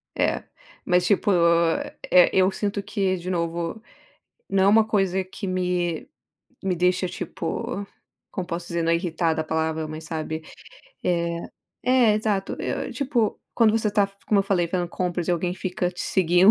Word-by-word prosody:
É, - - +1 0.4
mas 180 0 +3
tipo. 205 +2 +3 0.8
É, 180 -1 +7
eu 190 0 +4
sinto 200 0 -2
que, 195 -3 0
de 180 +1 -6
novo, 170 +3 -2 0.7
não 190 -1 +3
é - - +5
uma 220 +1 +5
coisa 195 -3 +1
que 185 +1 -7
me 180 - -1 0.6
me 190 -2 0
deixa, 180 +2 +2
tipo, 180 +2 -4 0.5
como 185 -2 -4
posso 170 0 -4
dizer? 170 -1 -1
Não 165 - +2
é - - +5
irritada 165 -2 0
a - - -3
palavra, 160 0 -1
mas 155 +1 -7
sabe, 160 -1 -4 0.6
eh 170 -1 0 0.4
eh, 250 -3 +4
exato. 210 -2 -1
Eu - - -2
eu, - - -6
tipo, 250 -6 0
quando 230 -2 +5
você 220 -1 +1
tá, 205 -1 +3 0.2
como 205 -2 +4
eu - - -2
falei 185 -3 +1
fazendo 175 0 -1
compras 175 -1 -2
e - - +3
alguém 175 +1 0
fica 180 -1 -2
te 180 - -9
seguindo. 180 +1 +5
180 Hz, 170 wpm, -24 LUFS, 170-200 Hz, 0.8 s, É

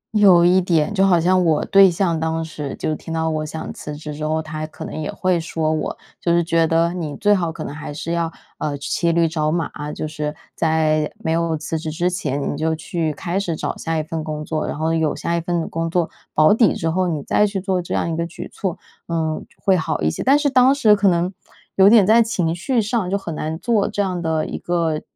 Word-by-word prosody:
有 185 -5 +6
一 185 +1 +5
点。 170 +2 +1
就 195 -1 +3
好 175 -3 +4
像 185 +2 +3
我 160 -3 +2
对 195 -1 +6
象 170 -2 0
当 160 0 -1
时 150 -3 -6
就 155 - -2
听 165 - -9
到 160 0 0
我 155 0 -2
想 160 +1 -6
辞 150 -1 -7
职 150 0 -7
之 150 +1 -6
后， 160 0 0
他 155 0 -5
可 - - -9
能 - - -7
也 150 - -3
会 185 -2 0
说 160 -1 -1
我 155 - -3 0.2
就 170 - +1
是 170 0 +3
觉 165 0 +2
得 165 +1 +2
你 155 -5 -4
最 205 0 +3
好 170 -4 0
可 160 -1 -7
能 140 - -6
还 150 -1 -7
是 165 +3 -5
要， 170 -1 -1 0.3
呃， 145 -1 -2
骑 170 +4 0
驴 170 0 +3
找 155 -1 -1
马。 165 -1 -1 0.2
就 155 - -4
是 150 -1 -4 0.2
在 155 -2 +1
没 160 - -2
有 165 -1 0
辞 155 +1 -3
职 160 - -4
之 175 +3 0
前， 145 -7 -2
你 - - -5
就 160 +2 0
去 160 0 -2
开 175 +5 -2
始 175 -5 -2
找 - - -3
下 165 -1 -3
一 155 - 0
份 160 0 -4
工 155 -1 -5
作， 155 -1 -2
然 - - -4
后 160 +1 0
有 160 -2 +1
下 170 - -2
一 170 - 0
份 170 -1 -2
工 165 0 -2
作 170 -1 +1 0.3
保 155 +5 +6
底 225 -1 +4
之 165 0 -1
后， 185 +1 +1
你 155 -5 -2
再 210 - +2
去 200 -1 -3
做 185 -1 -1
这 175 - -4
样 - - 0
一 - - -2
个 170 +1 -2
举 170 - -8
措， 185 -3 -3 0.3
嗯， 160 -2 -2 0.2
会 195 - +4
好 160 -3 -1
一 80 - +2
些。 - - -5
但 275 +3 +5
是 295 -1 +1
当 260 +1 +5
时 215 -7 +5
可 200 0 +2
能 175 +1 +1 0.4
有 195 +1 +7
点 215 -3 +7
在 225 +3 +6
情 180 -8 0
绪 240 +7 0
上 215 -3 -1
就 200 - +1
很 170 -5 -6
难 155 +1 -3
做 210 +2 +1
这 - - -6
样 180 -3 -2
的 160 -1 0
一 - - -5
个 165 -3 -1
165 Hz, 265 characters per minute, -21 LUFS, 155-185 Hz, 0.4 s, 有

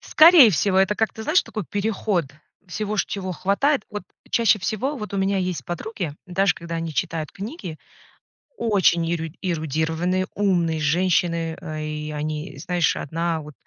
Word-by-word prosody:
Скорее 315 -7 +8
всего, 190 +2 +2
это 195 +2 +3
как-то, 220 0 -1
знаешь, 310 +10 +3
такой 215 -4 -5
переход 205 -4 0 0.4
всего, 210 +4 -3
c - - +2
чего 190 -2 -4
хватает. 200 - +1
Вот 210 0 -5 0.3
чаще 225 -4 +4
всего 225 +9 -2
вот 210 -3 -7
у - - -1
меня 195 0 +1
есть 180 -7 -2
подруги, 175 -3 -4
даже 185 0 +2
когда 170 0 -6
они 165 -1 -3
читают 165 -4 -2
книги, 195 - -7 0.8
очень 190 -6 +3
е 165 -2 -2
эрудированные, 165 +2 -1
умные 175 -6 +1
женщины, 170 0 +1 0.2
и 150 0 -4
они, 150 +2 -4
знаешь, 175 -2 +1
одна 165 +2 -2
вот 150 0 -11
180 Hz, 150 wpm, -23 LUFS, 165-205 Hz, 0.8 s, Скорее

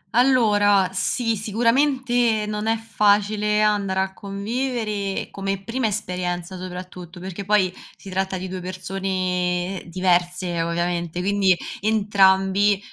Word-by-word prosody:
allora 205 -7 +4
sì, 230 +4 0
sicuramente 240 +1 +1
non 210 +1 -3
è 225 0 +2
facile 210 -1 +2
andare 200 -3 +1
a 190 0 -2
convivere 210 0 -3
come 195 0 -3
prima 230 +3 -1
esperienza 180 -3 -3
soprattutto, 180 -1 -8
perché 190 +2 -6
poi 190 -3 +2 0.2
si 195 - -11
tratta 190 0 -1
di 185 +1 -5
2 185 0 -5
persone 185 0 -2
diverse 175 -1 0
ovviamente, 170 0 -2
quindi 195 -1 +3 0.2
entrambi, 200 -1 +3
195 Hz, 110 wpm, -23 LUFS, 185-210 Hz, 0.2 s, allora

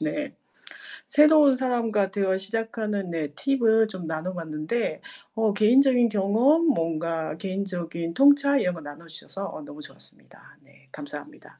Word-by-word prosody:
네 295 -2 -4 0.7
새로운 300 -2 +5
사람과 230 -6 -1
대화 190 -1 0
시작하는 210 -1 -4
네 160 -3 -3
팁을 225 -4 +2
좀 185 -5 -8
나눠 160 +3 -4
봤는데, 165 +6 -4 0.3
어 220 -2 +1
개인적인 245 +3 +4
경험, 225 +11 +2
뭔가 165 - -1
개인적인 175 -3 -4
통찰 280 +2 +4
이런 180 - 0
걸 165 - -10
나눠주셔서 165 +6 -9
어 - - -9
너무 145 0 -11
좋았습니다. - - -14 0.4
네, 140 0 -25
감사합니다. 145 0 -11
200 Hz, 305 characters per minute, -25 LUFS, 165-245 Hz, 0.7 s, 새로운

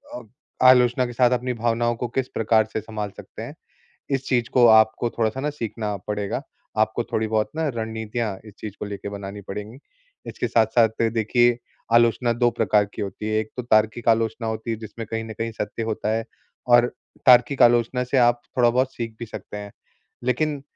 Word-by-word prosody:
अ, - - -6 0.5
आलोचना 125 0 +5
के 120 - -6
साथ 125 +1 +3
अपनी 125 +1 -3
भावनाओं 120 0 0
को 120 +1 -3
किस 130 -1 +1
प्रकार 110 0 +3
से 110 - -1
संभाल 105 -1 -5
सकते - - -10
हैं। - - -7 0.6
इस 135 -1 -1
चीज़ 120 -3 +1
को 125 -2 +6
आपको 110 +2 +5
थोड़ा 115 -2 0
सा 130 - -6
ना 150 - -1
सीखना 110 -6 -4
पड़ेगा। 105 -1 -3 0.4
आपको 110 +2 +1
थोड़ी 110 - +1
बहुत 110 -1 0
ना 160 -1 0
रणनीतियाँ 110 -1 -3
इस 105 -2 -13
चीज़ 105 -2 -7
को - - -3
लेके 100 0 -6
बनानी 100 0 -7
पड़ेगी। 105 +5 -7 0.5
इसके - - -3
साथ-साथ 115 0 +4 0.2
देखिए, 120 +2 +2 0.3
आलोचना 120 +1 +4
2 120 +1 +2
प्रकार 105 -2 +2
की - - -4
होती 100 +2 -5
है, 110 0 +1
एक 110 - -6
तो 125 - -3
तार्किक 110 0 +2
आलोचना 115 0 +1
होती 110 +1 -4
है 115 - -1
जिसमें 110 +1 -8
कहीं 115 0 -2
न 110 - -7
कहीं 115 0 -2
सत्य 110 +1 -4
होता 110 -1 -2
है। 115 - -2 0.4
और 120 0 +6 0.4
तार्किक 125 +1 +6
आलोचना 120 +1 +4
से 125 +2 -1
आप 120 -1 +4 0.2
थोड़ा 120 -1 +5
बहुत 130 +2 +1
सीख 115 -2 -5
भी 115 - -6
सकते 105 - -9
हैं। 100 -1 -8 0.5
लेकिन 140 +3 0
115 Hz, 195 wpm, -23 LUFS, 110-120 Hz, 0.6 s, को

